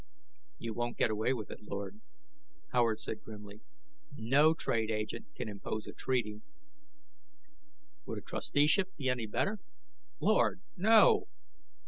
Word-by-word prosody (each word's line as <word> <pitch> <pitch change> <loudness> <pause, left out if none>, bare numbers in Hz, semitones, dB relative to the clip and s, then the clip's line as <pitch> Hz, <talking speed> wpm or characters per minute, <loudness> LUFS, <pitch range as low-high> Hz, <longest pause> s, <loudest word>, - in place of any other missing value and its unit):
"You 115 -4 -5
won't 120 +1 -3
get 115 - +2
away 110 +3 +1
with 115 -6 -3
it, - - -9
Lord," 100 0 -6 0.7
Howard 115 -3 +3
said 110 - -4
grimly. 105 -1 -11 0.6
"No 145 +8 +4
trade 115 -8 0
agent 110 +1 -3
can - - -4
impose 105 +1 -5
a - - -8
treaty 110 -5 -1 0.9
" 300 0 -42
"Would - - -4
a - - -5
trusteeship 185 - +1
be 135 -3 -1
any 125 -3 -1
better?" 200 - -1 0.6
"Lord, 210 -3 +2
no!" 220 - +5
120 Hz, 130 wpm, -32 LUFS, -, 0.9 s, no